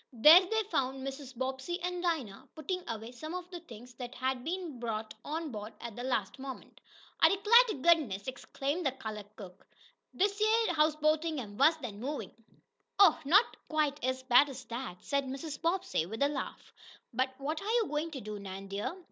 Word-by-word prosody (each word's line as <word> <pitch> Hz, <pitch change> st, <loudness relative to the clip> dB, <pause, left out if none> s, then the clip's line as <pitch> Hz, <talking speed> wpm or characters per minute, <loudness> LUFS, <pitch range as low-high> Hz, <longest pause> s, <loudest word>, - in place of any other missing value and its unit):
There 300 Hz, +10 st, +9 dB
they 440 Hz, +4 st, 0 dB
found 265 Hz, 0 st, -1 dB
Mrs. 270 Hz, -2 st, -7 dB
Bobbsey 265 Hz, +7 st, -3 dB
and 360 Hz, 0 st, -2 dB
Dinah 300 Hz, -, -2 dB
putting 360 Hz, +3 st, -3 dB
away 225 Hz, +1 st, -5 dB
some 310 Hz, +7 st, -7 dB
of 360 Hz, -1 st, -5 dB
the 350 Hz, -, -6 dB
things 245 Hz, -6 st, -12 dB
that 245 Hz, 0 st, -6 dB
had 260 Hz, 0 st, -1 dB
been 335 Hz, -5 st, -4 dB
brought 220 Hz, -2 st, -3 dB
on 315 Hz, 0 st, -4 dB
board 210 Hz, -1 st, -7 dB
at 235 Hz, -3 st, -7 dB
the 245 Hz, -, -6 dB
last 245 Hz, -2 st, -1 dB
moment. 265 Hz, -1 st, -9 dB, 0.4 s
"I -, -, +8 dB
'clar 440 Hz, +5 st, +7 dB
t' 435 Hz, -, -2 dB
goodness!" 285 Hz, -, +3 dB
exclaimed 275 Hz, +5 st, -3 dB
the 270 Hz, -4 st, +1 dB
colored 215 Hz, -5 st, -7 dB
cook, 185 Hz, -4 st, -11 dB, 0.5 s
"dish 405 Hz, +2 st, +1 dB
yeah 445 Hz, -2 st, +3 dB
houseboatin' 310 Hz, +1 st, +2 dB
am 205 Hz, -5 st, -7 dB
wuss 310 Hz, +7 st, +5 dB
dan 235 Hz, -9 st, -7 dB
movin'!" 260 Hz, -5 st, -4 dB, 0.7 s
"Oh, 385 Hz, -6 st, +7 dB
not 395 Hz, -, +5 dB
quite 300 Hz, -2 st, 0 dB
as 260 Hz, 0 st, -1 dB
bad 260 Hz, +3 st, +6 dB
as 260 Hz, -2 st, -8 dB
that," 230 Hz, -6 st, -6 dB
said 280 Hz, -1 st, 0 dB
Mrs. 275 Hz, +3 st, -6 dB
Bobbsey, 340 Hz, -, 0 dB
with 225 Hz, +7 st, -2 dB
a 285 Hz, -, +3 dB
laugh. 290 Hz, -2 st, -6 dB, 0.4 s
"But 260 Hz, +2 st, 0 dB
what 300 Hz, +3 st, -3 dB
are 405 Hz, -, -4 dB
you 470 Hz, -1 st, +3 dB
going 300 Hz, +2 st, -2 dB
to 280 Hz, -5 st, -7 dB
do, 210 Hz, 0 st, -6 dB
Nan, 195 Hz, 0 st, -8 dB
dear? 205 Hz, -, -3 dB
275 Hz, 190 wpm, -31 LUFS, 240-330 Hz, 0.7 s, There